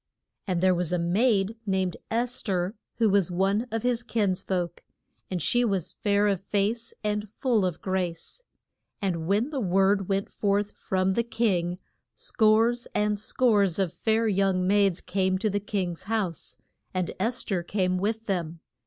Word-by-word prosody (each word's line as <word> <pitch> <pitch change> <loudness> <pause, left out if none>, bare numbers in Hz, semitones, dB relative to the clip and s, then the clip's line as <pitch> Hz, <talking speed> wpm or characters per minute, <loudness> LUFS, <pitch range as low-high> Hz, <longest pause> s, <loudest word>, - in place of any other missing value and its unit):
And 180 -3 0
there 185 0 +4
was 180 -1 -1
a 180 - +2
maid 195 +4 +1
named 190 -2 0
Es 240 +2 -1
ther, 185 -2 -1 0.2
who 230 - +3
was 195 -3 +3
one 195 +6 +1
of 225 -1 -3
his 245 -1 +1
kins 205 -6 0
folk. 175 -3 -2 0.5
And 185 - -2
she 240 +7 +2
was 195 -7 -1
"fair 205 0 +1
of 195 -3 0
face, 210 +4 -1
and 210 0 -1
full 230 -1 +1
of 180 -3 -2
grace." 185 - -3 0.6
And 170 -5 -2
when 210 - +1
the 280 - -2
word 195 -1 +2
went 195 0 -1
forth 205 0 0
from 190 0 -1
the 235 - +2
king, 190 -7 0 0.4
scores 225 +2 +2
and 210 0 +1
scores 210 -5 +2
of 190 -4 0
fair 225 0 +1
young 195 -2 +2
maids 200 -2 +3
came 190 0 0
to 215 +2 0
the 205 - 0
king's 190 -4 -3
house, 200 -7 -2 0.4
and 185 -2 -1
Es 235 +5 0
ther 190 -5 -1
came 185 0 0
with 220 +3 -1
them. 170 -5 -2
195 Hz, 165 wpm, -27 LUFS, 185-220 Hz, 0.6 s, there